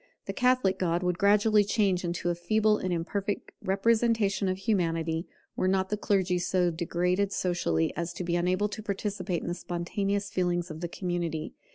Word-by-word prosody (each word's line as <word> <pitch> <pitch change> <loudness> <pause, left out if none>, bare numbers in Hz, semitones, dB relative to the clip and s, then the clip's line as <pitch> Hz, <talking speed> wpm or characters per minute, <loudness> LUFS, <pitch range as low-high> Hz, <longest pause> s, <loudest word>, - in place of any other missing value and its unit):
The - - -4
Catholic 250 -7 +2
God 175 -1 0
would 180 -1 0
gradually 210 +1 +5
change 200 -3 +1
into 175 0 -1
a - - +1
feeble 215 +5 +2
and 185 - -2
imperfect 195 +4 -2
representation 210 0 +2
of 185 - -1
Humanity, 165 -5 0 0.3
were 185 - 0
not 190 0 +1
the 210 - 0
clergy 190 -3 +1
so 180 0 +1
degraded 180 +4 0
socially 170 - 0
as 170 +1 -3
to 180 - -5
be 170 0 -1
unable 180 +4 +1
to 215 - -6
participate 195 -3 -3
in - - -6
the 175 - -1
spontaneous 195 +3 -2
feelings 175 -1 0
of 155 +1 -8
the 175 - -2
community. 175 -4 -3
185 Hz, 175 wpm, -28 LUFS, 175-205 Hz, 0.3 s, gradually